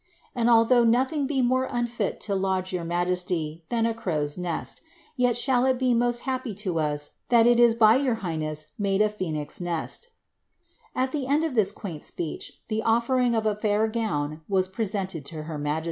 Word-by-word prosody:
And 240 -3 +1
although 235 +1 +5
nothing 260 +5 +2
be 270 -3 +1
more 255 +1 +2
unfit 240 -4 -2
to 200 - -2
lodge 190 -1 -1
your 180 -2 -2
majesty 175 -2 -2
than 230 -1 +1
a 230 - +1
crow's 155 -10 -2
■eirt, 175 -3 -4 0.3
yet 245 -3 +2
shall 250 0 +3
it 260 -1 +2
be 255 -1 +2
most 240 0 +1
happy 255 -5 -3
to 185 -5 -2
us 150 -1 -1 0.2
that 235 -2 +5
it 240 0 +5
is 235 -1 +6
by 225 0 +6
your 265 -4 +1
highness 155 -2 -2
made 195 -1 +1
t 210 - +4
phcsnix 180 -8 -3
nest" 175 - -3 0.9
At 260 +1 0
the 280 -3 -2
end 290 +3 +2
of 320 -4 -1
this 210 -5 +3
quaint 175 -9 -7
speech, 165 -3 -4
the 220 -1 -1
offering 235 +2 +2
of 220 -1 0
a 215 - +2
fiur 215 +1 0
gown 155 -10 -2
was 190 -2 +2
presented 190 -5 -2
to 155 0 -6
her 155 -1 -6
majesty. 150 +2 -1
215 Hz, 190 wpm, -26 LUFS, 175-240 Hz, 0.9 s, is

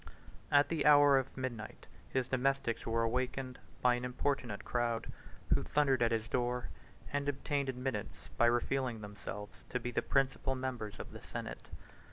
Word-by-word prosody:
2 - - -18 0.5
At 145 0 +6
the 165 -2 +1
hour 145 -2 +8
of 135 0 -6
midnight, 120 -4 -5 0.2
his 130 -1 0
domestics 130 -3 0
were 115 0 +2
awakened 125 +2 -1 0.2
by 125 -1 +6
an 120 0 -2
importunate 125 -3 -1
crowd, 120 -2 -1 0.4
who - - +3
thundered 135 -4 +2
at 115 -1 +4
his 115 -1 0
door, 125 0 -1 0.4
and 145 0 +1
obtained 140 0 -1
admittance 125 -4 -4
by 120 - +5
revealing 120 -1 +1
themselves 105 0 -8
to 125 - -1
be 125 +1 -3
the - - +1
principal 135 -1 +1
members 125 -5 -4
of - - -7
the - - -9
senate. - - -6
125 Hz, 165 wpm, -34 LUFS, 115-135 Hz, 0.5 s, hour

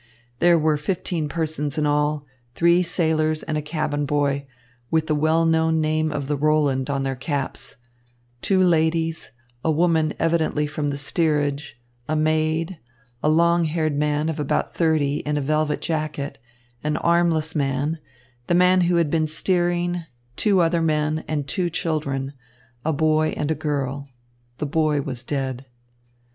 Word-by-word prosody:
There 175 -1 +5
were 155 -1 +2
fifteen 165 -1 -2
persons 155 -2 -2
in 150 - +1
all, 150 0 +1 0.3
three 170 +1 +4
sailors 160 -3 0
and 155 - -3
a 150 - 0
cabin 150 -1 -2
boy, 140 -1 0 0.4
with 160 -1 +1
the 155 - 0
well 155 +2 +2
known 160 0 +2
name 155 0 +1
of 145 -2 -3
the 145 - 0
Roland 145 -2 +1
on 140 -1 -1
their 135 -1 -2
caps, 135 -1 -4 0.7
two 190 -1 +3
ladies, 165 -1 +1 0.3
a - - +1
woman 160 -1 +2
evidently 160 -2 +1
from 145 0 -2
the 140 - -3
steerage, 145 -3 -1 0.3
a 155 - +1
maid, 155 +2 0 0.4
a 150 - +2
long 170 +2 +3
haired 155 -1 0
man 150 +1 0
of 160 -1 -3
about 145 - -1
thirty 155 -4 +1
in 150 0 -2
a - - +1
velvet 155 +2 0
jacket, 155 -4 -3 0.4
an 150 0 0
armless 170 -2 +2
man, 145 +2 -1 0.5
the 175 - +2
man 180 +1 +5
who 175 0 +2
had 165 -4 +2
been 160 -1 +1
steering, 175 +1 0 0.3
two 200 - +3
other 165 0 +2
men, 155 0 0
and 145 -3 -2
two 175 +5 -1
children, 145 -5 -2 0.5
a 160 - +1
boy 155 +1 +1
and 150 +1 -1
a - - +4
girl. 140 -2 -3 0.5
The - - -2
boy 150 0 +1
was 130 -3 -5
dead. 135 -1 -4
155 Hz, 155 wpm, -23 LUFS, 145-165 Hz, 0.7 s, There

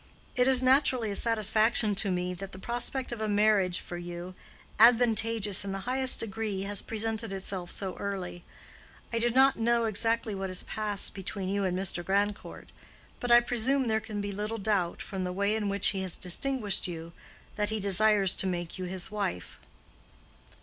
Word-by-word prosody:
"It 250 -1 +2
is 260 -1 +5
naturally 255 -4 +2
a - - -4
satisfaction 220 0 +3
to 200 +1 +1
me 180 0 -2
that 195 +2 -9
the - - -9
prospect 245 +5 -1
of 235 -2 -6
a 215 - -2
marriage 205 -3 +2
for 175 - -8
you—advantageous 210 +5 +1
in 195 -1 -4
the 195 - -5
highest 260 +1 +3
degree—has 205 -2 0
presented 225 -1 -4
itself 190 -2 -4
so 190 -2 -3
early. 185 -3 -6 0.7
I 230 - 0
do 240 +1 +1
not 265 +3 +4
know 235 0 +1
exactly 225 0 +1
what 195 -1 -4
has 185 - +1
passed 210 -2 0
between 190 0 -5
you 200 0 -1
and 180 -1 -1
Mr. 185 -2 -1
Grandcourt, 200 +2 -3 0.5
but 245 - -4
I 240 0 +7
presume 245 +3 -1
there 220 -1 +1
can 215 -1 -6
be 200 0 -4
little 210 +3 -4
doubt, 195 -5 -1
from 190 -2 -5
the 180 - -3
way 200 +3 -1
in 210 -2 -2
which 200 -1 +3
he 195 -2 -2
has 185 -2 0
distinguished 210 +3 0
you, 165 -1 -8 0.4
that 210 -1 -1
he 220 0 -2
desires 200 0 +3
to 190 - +2
make 175 0 -5
you 185 - -4
his 185 +2 -3
wife." 200 - -5
205 Hz, 175 wpm, -28 LUFS, 190-225 Hz, 0.7 s, I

